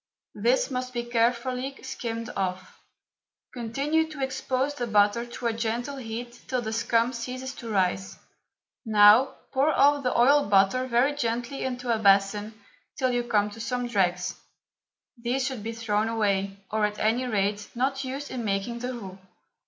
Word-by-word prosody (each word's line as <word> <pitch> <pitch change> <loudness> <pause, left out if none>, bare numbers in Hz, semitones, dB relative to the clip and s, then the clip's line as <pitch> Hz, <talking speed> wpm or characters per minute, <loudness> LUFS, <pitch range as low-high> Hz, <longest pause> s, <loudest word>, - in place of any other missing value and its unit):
This 240 +6 +1
must 255 0 -3
be 240 -1 -2
carefully 245 +3 0
skimmed 230 -1 -5
off. 185 -1 -3 0.7
Continue 280 +7 0
to 295 -3 -5
expose 265 +1 -1
the 245 -4 -3
butter 210 +2 +3
to 240 +1 -8
a 230 - +2
gentle 235 +5 -2
heat 240 0 -6
till 255 - 0
the 220 0 -3
scum 230 +2 +1
ceases 255 +2 -5
to 235 - -7
rise. 190 -2 0 0.7
Now 215 +3 +6 0.2
pour 275 +3 +3
off 290 -1 +4
the 250 -2 0
oiled 280 0 +5
butter 200 +6 +3
very 255 +4 +2
gently 240 0 -2
into 250 -2 -1
a 225 - 0
basin 205 +1 +2 0.4
till 255 -1 +1
you 245 0 +1
come 210 -3 +1
to 225 - -11
some 245 +2 -2
dregs. 185 -4 0 0.8
These 250 +3 0
should 260 -5 -3
be 225 +2 -4
thrown 220 -2 -1
away, 200 -3 0
or, 215 0 0
at 210 0 -8
any 235 +4 +1
rate, 205 -2 -1
not 270 +2 0
used 270 +2 -5
in 245 -2 -4
making 205 +3 -2
the 250 +1 -4
roux. 195 -5 -9
235 Hz, 160 wpm, -26 LUFS, 210-255 Hz, 0.8 s, Now